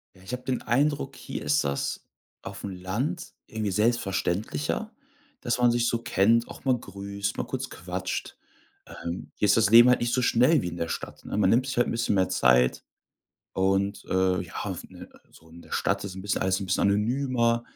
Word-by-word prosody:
Ja, 95 - -19
ich 110 - -8
habe 125 - -4
den 130 -1 -2
Eindruck, 140 +5 0
hier - - -6
ist 75 0 +2
das 70 0 -2 0.4
auf'm 100 - -6
Land 120 - -3
irgendwie 110 -3 -3
selbstverständlicher, 95 -7 -1 0.5
dass 120 0 -1
man 120 -1 +4
sich 120 0 +1
so 115 - 0
kennt, 115 +2 +2
auch - - -11
mal 130 -2 +3
grüßt, 100 -2 -5
mal - - -2
kurz - - -4
quatscht. 90 +2 -5 0.7
Ähm, 85 +2 -5
hier - - 0
ist 100 - +5
das 110 -2 +4
Leben 120 +2 +9
halt 125 - +3
nicht 120 0 0
so 125 - +2
schnell 125 +5 +4
wie 90 - -3
in 85 - -5
der 85 - -3
Stadt, - - -6
ne? - - -4
Man - - +3
nimmt 125 +3 +3
sich 130 - -4
halt 120 - +3
'n - - -2
bisschen 115 -3 0
mehr 95 -1 +3
Zeit 60 0 +3 0.7
und, 95 +2 0
äh, 95 0 +2
ja, 85 - -12
auf - - -4
'ne - - -12 0.2
so 80 - -19
in 85 +1 -14
der - - -18
Stadt - - 0
ist 95 -1 -6
'n 95 - -7
bisschen 100 0 -1
alles 95 0 +1
'n 95 - -4
bisschen 95 - +1
anonymer 120 +2 +1
105 Hz, 205 wpm, -26 LUFS, 95-120 Hz, 0.7 s, Leben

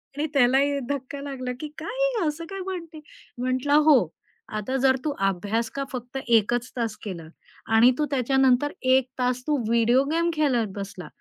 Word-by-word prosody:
आणि 300 +2 -1
त्यालाही 275 +2 +3
धक्का 280 0 -4
लागला 260 -3 -5
की, 305 - -5
काय 320 - -6
आहे - - +1 0.2
ही, - - +1
असं 320 +3 -3
काय 390 0 -6
म्हणते? 335 -5 -6 0.4
म्हटलं, 255 +3 0
"हो, 260 - +5 0.5
आता 215 +5 -3
जर 260 0 +4
तू 300 - +1 0.2
अभ्यास 205 +5 -1
का 275 - -1
फक्त 250 0 -6
1 230 -1 +3
च 245 +1 -2
तास 225 -3 -2
केला 170 -6 -6 0.5
आणि 235 +3 +7
तू 300 - +1
त्याच्यानंतर 265 +1 +2 0.2
1 265 -1 +3
तास 250 0 0
तू 300 - +2
व्हिडिओ 235 +3 +3
गेम 335 +1 +1
खेळत 265 -8 +1
बसला, 195 -2 -7
260 Hz, 175 wpm, -25 LUFS, 235-290 Hz, 0.5 s, आणि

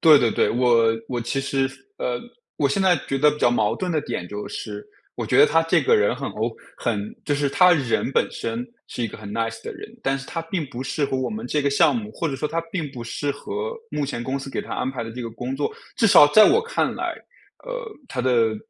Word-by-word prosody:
对 155 -3 +8
对 115 -4 +2
对， - - +2
我 120 -1 +4 0.2
我 120 -1 -2
其 120 +4 -1
实 135 -1 0 0.3
呃， 120 -1 -2 0.4
我 140 -2 +2
现 165 +8 +1
在 185 -2 +5
觉 135 - 0
得 150 +1 +5
比 150 - -6
较 120 - +4
矛 110 -2 +2
盾 180 +7 -3
的 155 - +1
点 90 - -4
就 105 0 -5
是， 105 -2 -6 0.3
我 - - -4
觉 - - +2
得 - - +9
他 165 +1 +3
这 165 0 +2
个 - - +4
人 105 +3 +2
很 135 +1 -4
O 115 +2 -2 0.2
很 105 -3 -2
就 145 - +1
是 145 0 +1
他 180 +6 +6
人 135 -5 +1
本 - - +2
身 230 +2 -4 0.2
是 120 - -5
一 115 - 0
个 - - -10
很 105 -1 -8
nice 115 0 -2
的 - - -5
人， - - -9
但 135 0 +1
是 135 - -9
他 165 - -3
并 165 -1 -3
不 130 -1 -6
适 135 +2 -1
合 135 - -1
我 130 -1 -1
们 220 +1 -5
这 150 - 0
个 140 - +2
项 140 - +4
目， 215 -2 -4
或 165 - -2
者 135 - -3
说 150 - -1
他 165 +2 -1
并 155 -6 -2
不 125 -3 -7
适 140 +5 -2
合 435 - -4 0.2
目 145 - -1
前 120 -3 -4
公 135 +3 -2
司 135 0 -7
给 - - -2
他 - - -8
安 130 - -1
排 130 -3 -4
的 115 - -6
这 125 +2 -7
个 115 - -5
工 125 +4 -5
作。 145 - -1 0.2
至 225 - +4
少 150 -8 +9
在 215 +9 +8
我 445 +5 +4
看 470 +1 -1
来， - - -2 0.5
呃， - - -5 0.2
他 125 - -3
的 115 -3 +2
135 Hz, 290 characters per minute, -23 LUFS, 120-160 Hz, 0.5 s, 得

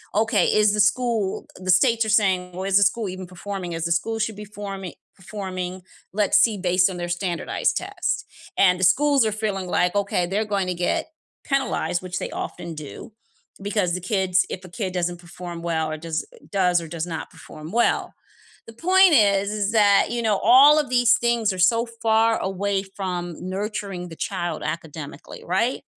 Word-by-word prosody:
"Okay, 225 +1 +2
is 210 -1 +3
the 210 - +3
school" 225 -2 0
the 185 0 -7
states 230 +4 +4
are - - -3
saying, 190 -4 +2
"Well, 185 +1 -5
is 195 0 +3
the 200 - +5
school 205 +2 +1
even 185 0 -7
performing, 185 -1 -6
is 165 0 -3
the 170 - -1
school 225 +6 0
should 220 -1 -2
be 210 0 -8
forming 195 -3 -7 0.2
performing, 185 -2 -6 0.3
let's 205 +1 +2
see 210 0 +3
based 180 0 +2
on 180 - -6
their 175 0 -4
standardized 175 -1 -1
tests," - - -3 0.3
and 180 -2 +4
the - - -1
schools 280 +4 +4
are 215 - +1
feeling 205 -3 -2
like, 180 +2 +1
okay, 200 -3 0
they're 205 +4 -1
going 190 -2 0
to 180 - -1
get 310 - -1 0.3
penalized, 270 -9 -1
which 180 0 -5
they - - -4
often 170 -2 -6
do, 155 - -9 0.5
because 200 -3 0
the 185 - -3
kids 190 -1 +1
if 185 - -6
a - - -11
kid 185 -1 -4
doesn't 175 -1 -1
perform 175 0 -9
well, 160 -2 -1
or 155 - -4
does 160 0 -4 0.3
does 180 -3 +2
or 165 - -8
does 165 +1 -4
not 160 -2 -5
perform 155 +2 -11
well. 235 +1 +1 0.5
The 230 - -11
point 370 +5 +4
is, 200 -4 +4
is 210 0 -1
that, 205 -2 +5
you 240 0 -1
know, 210 -3 +2
all 275 +7 +7
of 285 -4 -2
these 245 -2 +4
things 235 -4 +1
are 185 - -7
so 230 +6 +3 0.2
far 225 0 +3
away 195 +1 -1
from 180 -3 -5
nurturing 195 -2 -4
the 165 - -9
child 175 -1 -3
academically, 155 -2 -7
right? 210 +9 0
195 Hz, 190 wpm, -23 LUFS, 180-215 Hz, 0.5 s, all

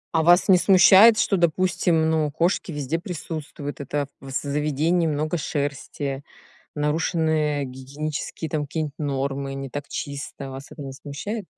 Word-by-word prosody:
А 160 - +4
вас 175 +2 +5
не 185 -2 +6
смущает, 195 +4 +7
что, 195 -2 +2
допустим, 170 -1 +2
ну, 155 -2 +1
кошки 170 +4 0
везде 150 +2 -2
присутствуют, 155 -4 -6
это 145 +1 -2
в 135 - -10
з 135 - -2
заведении 150 +4 +1
много 155 +2 -1
шерсти, 140 -1 -3 0.5
нарушены 150 -1 0
гигиенические 140 +5 -5
там 150 0 -1
какие-нибудь 145 0 -3
нормы, 140 -1 -2
не 135 0 -5
так 145 +2 -6
чисто. 140 -2 -6
Вас 135 +1 -8
это - - -11
не 135 - -6
смущает? 195 +11 -5
150 Hz, 145 wpm, -24 LUFS, 140-165 Hz, 0.5 s, смущает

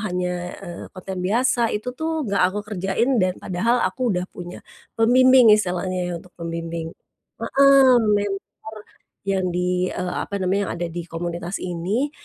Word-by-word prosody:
hanya, 180 -3 -2 0.3
eee, 175 -1 -8
konten 185 0 -7
biasa 235 +4 +2
itu 220 +4 -3
tuh 315 +2 -2
nggak 200 -2 0
aku 205 +2 -4
kerjain 210 +5 0
dan 185 0 +1
padahal 230 +7 0
aku 235 +7 -1
udah 180 - -1
punya 175 0 -9 0.3
pembimbing 250 0 +6
istilahnya 185 -2 0
ya - - -3
untuk 175 +1 -13
pembimbing. 165 0 -4 0.8
Heeh, 265 -3 +7
mentor 205 -2 +1 0.8
yang 195 -2 0
di, 180 0 0
eee, 180 0 -3
apa 200 - -4
namanya, 195 +2 +1
yang - - -3
ada - - 0
di 175 +1 -5
komunitas 170 +2 -4
ini, 185 +11 -1
190 Hz, 150 wpm, -22 LUFS, 180-230 Hz, 0.8 s, Heeh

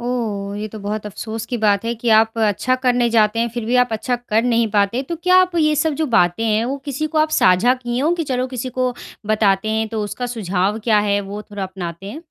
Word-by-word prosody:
ओह! 215 -5 -3
ये 215 - -3
तो 215 - -9
बहुत 210 +1 -4
अफ़सोस 220 +2 -6
की 245 - -3
बात 205 -1 +2
है 235 - -1
कि 240 - -2
आप 225 +1 +2
अच्छा 220 +4 +1
करने 245 -2 +2
जाते 220 -1 +3
हैं, 235 +1 +1
फिर 240 -2 -3
भी 245 +3 +1
आप 245 -2 -3
अच्छा 245 +3 -1
कर 230 -2 0
नहीं 235 -2 +2
पाते, 205 +4 +1
तो 335 +5 -5
क्या 365 +3 +3
आप 360 -1 -8
ये 305 -1 +3
सब 320 -2 0
जो 310 - +1
बातें 175 +4 +2
हैं, 220 0 +1
वो 270 +3 -2
किसी 280 +3 -2
को 310 - +3
आप 310 0 +2
साझा 185 +8 +4
की 245 -1 -4
होए 315 +6 +2
कि, 330 - -2
"चलो, 250 +1 0
किसी 255 0 -5
को 255 -1 +1 0.4
बताते 205 -1 +2
हैं, 220 0 -1
तो 220 -1 -3
उसका 245 +4 -4
सुझाव 195 0 -1
क्या 215 -2 +5
है? 200 0 +2
वो 205 +2 -7
थोड़ा 205 -1 -5
अपनाते 185 -1 -6
हैं।" 310 - -9
225 Hz, 250 wpm, -19 LUFS, 205-250 Hz, 0.4 s, क्या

